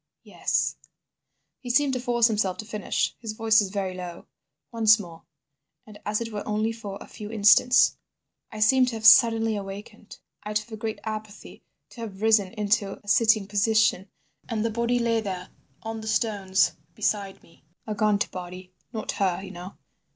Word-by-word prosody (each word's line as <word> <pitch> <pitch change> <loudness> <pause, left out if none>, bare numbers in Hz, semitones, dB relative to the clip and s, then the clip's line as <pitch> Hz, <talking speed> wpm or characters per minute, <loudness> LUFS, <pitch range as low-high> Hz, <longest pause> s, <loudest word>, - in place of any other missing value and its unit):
"Yes." - - -1 0.8
He 250 - -9
seemed 275 +2 +2
to 255 - -1
force 240 -2 +2
himself 205 -5 +1
to 215 - -7
finish. 210 -2 -2
His 225 -2 -5
voice 220 0 +3
was 205 -3 0
very 190 -2 -3
low. 180 -2 -8 0.5
"Once 220 -1 +5
more, 170 -5 -11 0.6
and 210 -1 -13
as 210 0 0
it 230 -1 -5
were 205 - -3
only 215 +1 0
for 210 -4 -7
a - - -10
few 210 -1 -9
instants. 220 +3 +5 0.5
I 215 - -7
seemed 255 +4 +4
to 240 - -3
have 220 -1 -6
suddenly 225 -1 +6
awakened 205 +2 -9 0.3
out 210 0 -1
of 215 +2 -13
a - - -5
great 220 0 -5
apathy, 215 -1 -7 0.3
to 235 - -11
have 210 -2 -7
risen 215 -4 +3
into 205 -2 -1
a - - -22
sitting 220 -1 +3
position, 205 -1 +1 0.4
and 225 -2 -1
the 230 - 0
body 235 +2 0
lay 230 -1 +1
there 185 -3 -5 0.3
on 225 0 -5
the 220 - -8
stones 200 -4 +1 0.2
beside 200 -2 -2
me. 165 - -23 0.2
A 215 - -3
gaunt 210 -1 +1
body. 180 0 -9 0.2
Not 220 -3 -4
her, 190 -1 -1
you 190 - -8
know. 180 +1 -10
215 Hz, 175 wpm, -25 LUFS, 200-225 Hz, 0.8 s, suddenly